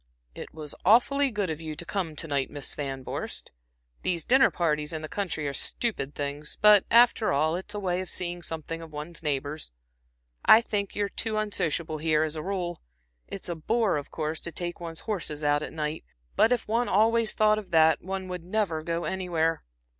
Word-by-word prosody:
"It - - -8
was 155 -2 -8
awfully 270 +7 +5
good 205 -7 -1
of 160 0 -5
you 155 -1 -5
to 170 - -7
come 170 -4 -3
to 165 - -2
night, 140 -3 0
Miss 145 -2 -3
Van 135 -2 -4
Vorst. - - -5 0.5
These 170 -3 -1
dinner 265 +2 +6
parties 150 -3 -1
in 155 0 -4
the - - -4
country 165 -5 -2
are 140 - -2
stupid 150 - -1
things, 145 +1 -4
but, 210 -2 +7
after 235 -1 +5
all, 155 +4 +2
it's 190 +4 -6
a - - -2
way 185 -2 -1
of 185 - -7
seeing 175 -1 -3
something 165 0 -5
of 165 -1 -10
one's 150 +3 -7
neighbors. 145 - -2 0.7
I 220 - +9
think 205 -4 -3
you're 205 -1 +1
too 220 +2 -2
unsociable 170 -7 -1
here, 155 0 +2
as 155 0 -2
a 155 - -3
rule. 180 -1 -3 0.5
It's 195 - -6
a 175 - -2
bore 215 +6 +1
of 145 - -6
course 155 0 -3
to 170 - -6
take 175 +1 -4
one's 165 -2 -6
horses 165 -8 -3
out 145 0 +3
at - - -5
night, 155 0 -3 0.3
but 225 - +4
if 245 -2 +1
one 230 +3 +1
always 225 +3 +3
thought 215 0 +4
of 200 -4 -10
that, 160 -2 +5
one 190 +1 -4
would 180 -2 -5
never 185 -4 -1
go 170 +1 -2
anywhere." 170 -4 0
170 Hz, 200 wpm, -27 LUFS, 155-205 Hz, 0.7 s, I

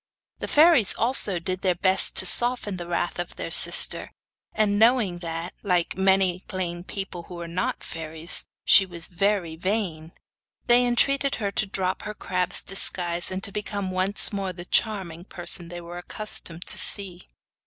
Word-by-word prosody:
The - - -5
fairies 300 - +4
also 225 -5 +2
did 185 +2 -4
their 185 -2 0
best 190 +2 +2
to - - +4
soften 225 0 +3
the 175 -1 -8
wrath 175 0 -3
of 175 - -5
their - - -6
sister, - - +4 0.4
and 205 -1 0
knowing 220 -6 +2
that, 165 0 -4
like 180 -4 0
many 190 -1 +1
plain 175 -2 -4
people 190 -2 -7
who 175 -1 -9
are 170 - -7
not 175 +2 -3
fairies, 160 +1 -5 0.2
she 195 - +6
was 175 -3 -4
very 185 -2 -1
vain, 175 -3 -3 0.5
they 245 +1 +4
entreated 275 +3 +1
her 205 -4 -3
to 210 - -2
drop 185 -1 -3
her 210 0 -7
crab's 180 -1 -3
disguise, 175 -2 +1
and 185 +1 -5
to 200 - -3
become 200 -2 -4
once 185 +3 +5
more 195 -2 -3
the 175 -1 -10
charming 185 -6 -1
person 175 -2 -2
they 175 +1 -9
were 175 +1 -9
accustomed 175 -3 -5
to - - -3
see. 190 -3 -1
185 Hz, 165 wpm, -24 LUFS, 175-205 Hz, 0.5 s, she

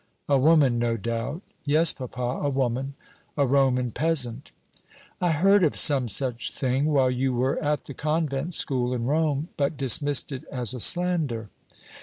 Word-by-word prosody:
"A 140 - +2
woman, 140 -4 +3
no 115 -1 0
doubt." 115 - -4 0.2
"Yes, 155 +2 +3
papa, 125 -1 -5
a 145 - +1
woman 135 0 -2 0.4
a 140 - +3
Roman 130 -2 +1
peasant." 140 -5 -1 0.7
"I 175 - +1
heard 195 +6 +3
of 155 - +1
some 135 -4 +4
such 120 +2 0
thing 130 +1 -1
while 135 -4 +2
you 125 0 -1
were 130 +6 -1
at 150 0 -1
the 140 - -9
convent 155 +1 -2
school 125 -2 0
in 115 -1 -3
Rome, 150 +2 0
but 140 +1 -1
dismissed 140 +2 +1
it 130 -2 -6
as 125 -3 -2
a 125 - -6
slander." 155 - +1
135 Hz, 160 wpm, -25 LUFS, 125-150 Hz, 0.7 s, some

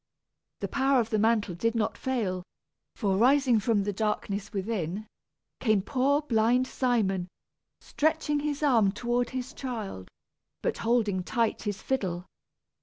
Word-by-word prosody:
The - - -1
power 270 -1 +2
of 225 -1 -1
the 215 - +2
mantle 220 -3 +2
did 230 +7 -1
not 220 -2 0
fail, 220 -9 -1 0.5
for, 195 -4 0
rising 255 0 +4
from 210 -1 +1
the 205 +1 -2
darkness 210 -1 -2
within, 200 -2 -3 0.5
came 215 -5 +2
poor 280 +5 +1
blind 240 -1 +3
Simon, 215 -9 0 0.5
stretching 305 -1 0
his 295 0 -2
arms 225 -9 +4
toward 240 +1 0
his 260 +2 -5
child, 220 - -5 0.5
but - - -1
holding 220 -5 +1
tight 230 +4 0
his 205 -2 -4
fiddle. 185 -9 -1
230 Hz, 135 wpm, -28 LUFS, 200-255 Hz, 0.5 s, rising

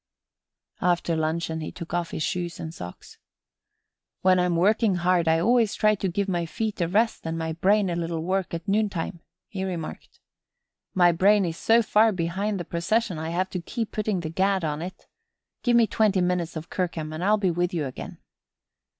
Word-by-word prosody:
After 175 -1 +1
luncheon 160 +1 -1
he 155 - -5
took 170 - -9
off 175 -1 -1
his 155 - -3
shoes 175 +1 -3
and 160 0 -6
socks. 90 - -10 1.0
"When 185 0 +4
I'm 180 -1 +1
working 205 +3 +3
hard 175 -1 +2
I 160 0 +4
always 225 +4 +3
try 215 0 +3
to 195 -2 -2
give 195 +3 -1
my 175 -3 -1
feet 215 +1 -3
a 170 - +2
rest 215 0 +1
and 165 0 -2
my 160 0 -2
brain 195 +4 +3
a 175 - -1
little 165 -1 -2
work 190 +1 -1
at 170 +4 -7
noontime," 195 -4 -1 0.3
he 190 -2 -5
remarked. 175 -4 -6 0.8
"My 175 -2 +6
brain 195 +4 +4
is 165 -1 -3
so 230 +1 +4
far 220 +1 +4
behind 190 +3 -2
the 175 - -4
procession 180 +1 0
I 160 +1 -3
have 185 +3 -1
to 180 - -3
keep 225 +5 -4
putting 210 -4 -1
the 160 - -4
gad 190 +1 +1
on 150 -1 -2
it. 185 +2 -8 0.6
Give 245 -2 +2
me 235 - +6
twenty 210 -3 +2
minutes 180 -2 0
of 160 +1 -7
Kirkham 165 -4 -2
and 160 +3 -4
I'll 210 +2 +4
be 190 -4 +1
with 175 +1 0
you 160 -4 -1
again." 130 - -7
180 Hz, 195 wpm, -25 LUFS, 165-200 Hz, 1.0 s, My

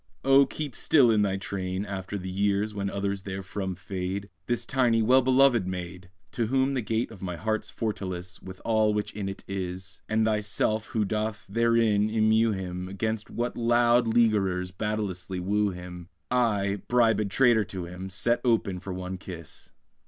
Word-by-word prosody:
Oh, 135 0 +6
keep 150 -3 -5
still 130 -7 +4
in 110 -2 +3
thy 100 -1 +1
train, 95 0 -3
After 100 0 -5
the 95 -1 -6
years 100 +2 0
when 100 -1 -2
others 100 0 -2
therefrom 95 0 -4
fade, 95 +2 -4 0.2
This 120 -1 0
tiny, 120 -4 +2
well 130 +4 +5
belovèd 130 -5 +4
maid! 90 -1 -6 0.2
To 115 -2 -1
whom 135 +3 +2
the 130 - 0
gate 110 +1 -1
of 95 - -12
my 90 -2 -4
heart's 110 +4 -2
fortalice, 95 -5 -4
With 95 0 -10
all 110 -2 +3
which 105 - -2
in 100 -1 -3
it 95 - -7
is, 95 -1 -5
And 110 0 +2
the 110 -1 +2
shy - - -1
self 110 +1 0
who 110 -2 0
doth 110 +2 -2
therein 115 -1 +2
immew 110 +1 +3
him 95 -1 -5
'Gainst 110 +1 -2
what 120 +1 -3
loud 120 0 +3
leaguerers 100 -6 +2
battailously 95 -2 -3
woo 105 +3 +1
him, 90 -1 -8 0.2
I, 105 -5 +1
bribèd 115 -4 +3
traitor 120 -1 +4
to 95 -2 -6
him, 90 +2 -7
Set 100 +6 +1
open 110 -6 +1
for 95 +1 -7
one 90 0 -5
kiss. 85 -5 -9
105 Hz, 175 wpm, -27 LUFS, 95-115 Hz, 0.2 s, Oh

